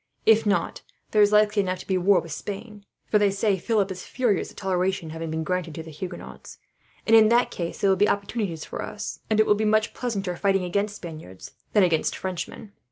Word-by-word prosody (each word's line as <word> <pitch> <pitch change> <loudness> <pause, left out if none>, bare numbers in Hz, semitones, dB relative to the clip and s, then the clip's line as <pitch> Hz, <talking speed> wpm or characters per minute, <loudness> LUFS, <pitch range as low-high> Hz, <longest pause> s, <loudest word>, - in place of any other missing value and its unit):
If 220 -1 +5
not, 200 - 0 0.3
there 215 - +4
is 205 0 +5
likely 210 0 +4
enough 185 -1 -2
to - - -12
be 190 - 0
war 185 +2 +4
with 165 - -10
Spain, 205 +5 -7 0.2
for 210 - +2
they 205 -1 +4
say 195 0 0
Philip 200 0 0
is 185 -1 -6
furious 240 -6 0
at - - -17
toleration 185 -3 -1
having 165 0 -5
been 160 0 -2
granted 170 -2 -2
to 160 - -6
the 160 - -10
Huguenots; 180 +4 -8 0.5
and 225 - +5
in 220 -1 +7
that 240 +1 +3
case 170 -1 -5
there 200 - +3
will 190 - +2
be 205 +2 +3
opportunities 200 -5 -2
for - - -6
us, - - -6
and 215 -1 +2
it 215 - +6
will - - +5
be 210 +1 -1
much 215 0 +2
pleasanter 200 -7 -3
fighting 195 +1 +1
against 200 +3 -1
Spaniards 155 - -10 0.2
than 210 - +5
against 165 -3 +1
Frenchmen. 190 +3 -6
195 Hz, 220 wpm, -25 LUFS, 180-210 Hz, 0.5 s, in